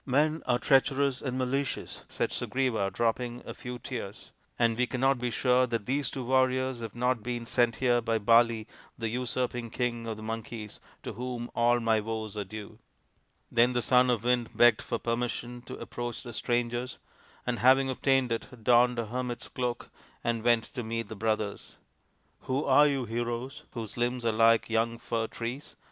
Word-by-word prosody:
" - - -43
Men 155 +2 +2
are 120 -1 +3
treacherous 135 0 +2
and 130 -2 -3
malicious," 130 +1 -2
said - - -1
Sugriva, 125 -7 0
dropping 120 +1 -1
a - - -6
few 125 -3 -7
tears, 120 -6 -7
" - - -41
and 115 -1 +3
we 125 +2 +1
cannot 135 +1 +1
be 125 0 -1
sure 125 +2 +3
that 115 -3 -2
these 135 0 0
two 130 - -5
warriors 130 0 +2
have 115 -3 -6
not 125 -1 +1
been 120 +1 -4
sent 120 -1 +2
here 120 0 +2
by 115 0 +1
Bali, 115 +1 +4 0.3
the 115 -1 -2
usurping 125 0 -2
King 120 -1 -2
of 110 -2 -4
the 110 - -9
Monkeys, 110 -1 -6 0.2
to - - -5
whom 120 +1 -5
all 120 +1 +3
my 115 -1 +2
woes 110 -1 -4
are 105 - -2
due." 110 +2 -9 0.7
Then 120 +1 +4
the 120 - +1
Son 125 +2 +4
of 120 -3 +1
the 120 - 0
Wind 120 -2 +2
begged 120 -2 +6
for 115 - -2
permission 120 +1 -3
to - - -7
approach 120 -1 -5
the 120 -2 -8
strangers, 120 +2 -1 0.5
and, 125 -1 -1
having 135 +2 +5
obtained 130 -1 +1
it, 115 0 -5
donned 120 +1 +5
a 115 - -1
hermit's 125 +1 -4
cloak 125 -2 -3 0.3
and 115 -1 -1
went 120 -1 +4
to 125 - -3
meet 115 -1 -3
the 110 - -6
brothers. 110 -1 -2 0.3
" - - -41
Who 135 +3 +1
are 145 +2 +6
you, 135 -3 0
heroes, 120 +5 -4
whose 115 -2 -6
limbs 120 0 -1
are 115 - +3
like 115 +1 +4
young 115 +1 0
fir 115 -1 -2
trees? 120 +6 -6
120 Hz, 190 wpm, -29 LUFS, 115-125 Hz, 0.7 s, begged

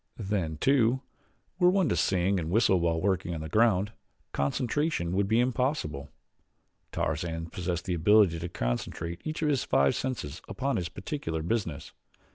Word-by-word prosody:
Then, 95 -7 -2
too, 130 - +3 0.6
were 180 -1 +6
one 190 -2 +3
to - - +1
sing 95 +1 +1
and 80 -1 -3
whistle 95 -1 +3
while 85 -1 +1
working 95 -2 0
on 80 - -5
the 80 - -5
ground, 105 0 +3 0.4
concentration 115 - 0
would 95 +2 +1
be 110 +3 +3
impossible. 125 - -1 0.8
Tarzan 80 +1 -2
possessed 90 -1 -3
the 90 - -1
ability 90 0 +4
to 85 +1 -4
concentrate 80 +6 -3
each 155 +1 -3
of 150 - +2
his 140 -3 +1
five 70 0 +3
senses 105 - -4
upon 130 +7 -1
its 85 - -3
particular 90 - -4
business. 85 -6 -2
95 Hz, 155 wpm, -28 LUFS, 80-120 Hz, 0.8 s, were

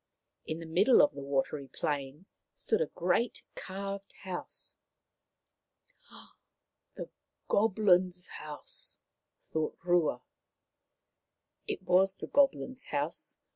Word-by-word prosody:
In 155 - -2
the 165 - -7
middle 190 +10 +5
of 290 - +3
the - - -7
watery 140 +1 -1
plain 145 +4 -3 0.3
stood 445 +1 +1
a 480 - +2
great 180 +7 0
carved 195 +1 -5
house. 185 -2 -5 1.4
" - - -19
The - - -6 0.4
Goblins' 185 -4 +3
house! 150 -1 -6 0.2
" - - -55
thought 155 -1 -1
Rua. 170 -8 +2 1.4
It 185 - -3
was 190 +1 +4
the - - -6
Goblins' 270 -2 +2
house. 145 +3 -3
180 Hz, 105 wpm, -32 LUFS, 155-200 Hz, 1.4 s, middle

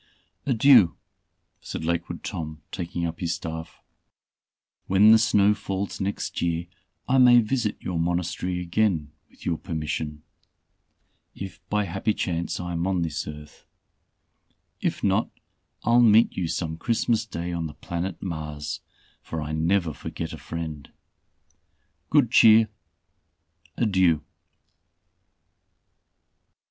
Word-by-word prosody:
"Adieu," 120 -7 +6 0.6
said - - -5
Lakewood 85 +1 -2
Tom, 80 -5 -5
taking 85 -2 -3
up 85 -1 -4
his 85 -1 -1
staff, 80 -1 -7 1.0
"when 100 +3 +6
the 110 - +8
snow 105 -1 +4
falls 100 -2 -4
next 100 +1 -3
year 85 0 0 0.4
I 130 +1 +3
may 125 -1 +8
visit 115 -1 0
your 90 -2 -3
Monastery 90 +1 -1
again 85 -4 0 0.2
with - - -17
your 80 - -1
permission, 75 -2 -4 1.1
if 95 0 -7
by 105 0 +1
happy 95 +4 -1
chance 85 -1 -2
I 90 0 -4
am 85 +1 -1
on 95 -3 +1
this 80 +1 -3
earth. 75 0 -10 1.1
If - - -2
not, - - +2 0.5
I'll 120 +1 +5
meet 115 -1 +5
you 90 -3 -1
some 80 -1 -3
Christmas 115 +2 +1
day 85 -3 -4
on 85 -2 -2
the 75 - -11
planet 85 +3 -5
Mars, 75 -4 -4 0.4
for 80 - -5
I 75 0 -4
never 80 +1 +1
forget 80 +3 -6
a 80 - -8
friend. 80 0 -6 1.2
Good 140 -7 +4
cheer! 110 -1 +7 1.1
Adieu." 95 -8 +3
85 Hz, 120 wpm, -25 LUFS, 80-105 Hz, 1.2 s, the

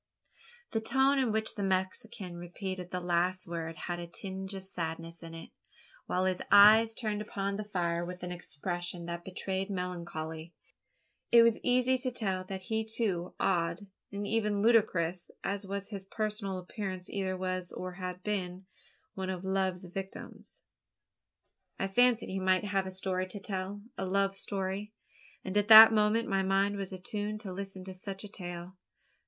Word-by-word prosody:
The 225 - 0
tone 265 +4 +3
in 255 -4 +2
which 220 0 0
the 205 - -5
Mexican 190 0 -1
repeated 180 +1 -5
the 180 - -2
last 180 +1 +1
words 165 -1 -4
had 175 -1 -3
a 170 - -6
tinge 190 +2 -6
of 190 0 -7
sadness 165 -2 -5
in 165 -1 -8
it 165 - -10 0.6
while 185 +1 +1
his 185 -1 0
eyes 220 +2 +8
turned 215 -3 -2
upon 200 -1 -2
the 210 - -3
fire 175 -4 -1
with 180 +1 -7
an 180 - -4
expression 175 0 -4
that 170 0 -5
betrayed 190 +1 -2
melancholy. 170 -3 -4 0.8
It 235 -1 +9
was 230 -1 +4
easy 255 +1 +3
to 255 0 0
tell 195 -7 -2
that 190 0 -5
he 220 +3 -1
too 210 -6 -2
odd, 170 -1 +1 0.3
and 200 0 -3
even 210 -2 +1
ludicrous 185 -7 +3
as 200 0 -2
was 200 0 -3
his 200 -3 -5
personal 210 -1 -3
appearance 185 0 -4
either 190 -2 -2
was, 185 -1 -2
or 185 0 -5
had 180 0 -6
been, 190 -3 -3 0.5
one 190 -1 -4
of 185 -1 -3
love's 190 -1 0
victims. 195 - -7 1.2
I 195 - 0
fancied 245 +4 +3
he 190 - -2
might 185 0 +3
have 195 -2 0
a - - -4
story 185 0 -1
to 200 +2 -7
tell 195 0 -4 0.2
a 190 - -1
love 195 +1 +1
story? 195 +1 -3 0.5
and 190 - -5
at 205 0 +3
that 220 0 +12
moment 215 +2 +3
my 195 0 +2
mind 195 +1 +2
was 195 -1 -4
attuned 205 +3 -4
to 195 -4 -6
listen 195 0 -6
to 190 0 -7
such 195 +2 -6
a - - -6
tale. 175 -2 -7
190 Hz, 170 wpm, -31 LUFS, 180-210 Hz, 1.2 s, that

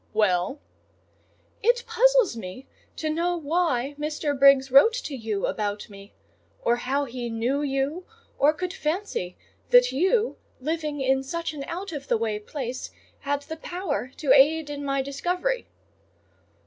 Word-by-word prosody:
"Well?" 205 +4 +1 1.0
"It 480 +2 +3
puzzles - - +4
me 225 +4 -8 0.3
to 315 - -3
know 340 +3 0
why 290 -4 0
Mr. 300 0 -1
Briggs 275 -1 +5
wrote 280 - +7
to 455 - -4
you 220 -5 -2
about 205 0 -3
me; 200 +1 -12 0.5
or 235 0 +3
how 275 +4 -1
he 245 -2 -5
knew 235 +5 0
you, 285 +5 -2 0.3
or 290 +2 +6
could 360 +3 -4
fancy 305 - -3 0.3
that - - +6
you, 400 - +1 0.2
living 300 0 -2
in 265 0 +2
such 335 +4 -4
an 285 -2 -6
out 375 +3 -5
of 285 -3 -6
the - - +2
way 220 -2 -1
place, 255 +2 -5 0.3
had 285 0 -2
the 320 +2 -7
power 320 -6 -4
to 285 -4 +3
aid 300 +2 +4
in 285 0 -5
my 275 -1 0
discovery." 360 - -2
285 Hz, 150 wpm, -25 LUFS, 255-335 Hz, 1.0 s, wrote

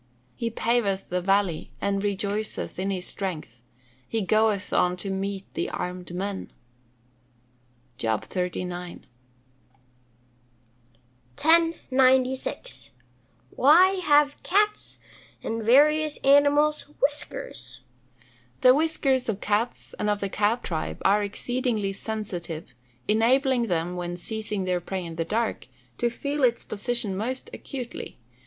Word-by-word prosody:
He 230 - -2
paveth 225 -4 0
the 180 0 -1
valley, 195 -3 +1
and 200 0 0
rejoiceth 205 0 -2
in 190 +1 -1
his 185 -2 -2
strength: 155 - -5 0.5
he 225 -2 -1
goeth 215 0 +2
on 180 0 +2
to 195 +2 -4
meet 195 0 -3
the - - -2
armed 180 -1 -5
men." 195 +1 -4 1.5
JOB 110 -1 -1
XXXIX.] 180 -1 -4 2.4
1096. 265 - +2 0.6
Why 335 +8 +6
have 290 -2 +4
cats, 420 +3 +1 0.5
and 225 0 -2
various 300 +6 +4
other 275 +1 +7
animals, 290 +1 +3
whiskers? 295 - -2 0.8
The 255 - +8
whiskers 275 -4 +1
of 205 -3 -1
cats, 215 +4 -1
and 210 - 0
of 205 -1 +1
the 200 - -2
cat 215 +5 +1
tribe, 160 -3 -3
are 205 +2 +5
exceedingly 215 0 -1
sensitive, 195 -6 -5 0.3
enabling 240 +3 +3
them, 175 -1 -1
when 175 0 -4
seizing 210 +1 -3
their 180 -1 0
prey 185 +1 -4
in 165 -1 -8
the 165 - -1
dark, 220 - -1 0.3
to 240 - +2
feel 280 +4 -3
its 240 -2 +3
position 215 -1 -2
most 250 +6 -4
acutely. 250 -4 -7
215 Hz, 115 wpm, -26 LUFS, 190-260 Hz, 2.4 s, The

